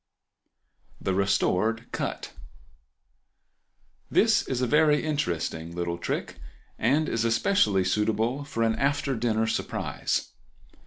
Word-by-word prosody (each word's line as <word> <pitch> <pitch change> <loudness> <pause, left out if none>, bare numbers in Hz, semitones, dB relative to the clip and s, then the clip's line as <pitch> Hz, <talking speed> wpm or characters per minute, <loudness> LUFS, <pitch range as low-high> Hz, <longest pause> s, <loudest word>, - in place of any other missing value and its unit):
The 95 - -1
Restored 100 +3 +1 2.1
Cut.—This - - +3
is 130 - -1
a 125 - +1
very 150 +2 +3
interesting 85 - -2
little 85 -1 -3
trick, - - -3 0.4
and 140 +7 +2
is 115 - 0
especially 115 - +2
suitable 110 +7 0
for 125 -5 -2
an 110 -1 +2
after 140 -1 0
dinner 110 -1 +1
surprise. 110 - -2
115 Hz, 100 wpm, -27 LUFS, 100-140 Hz, 2.1 s, Cut.—This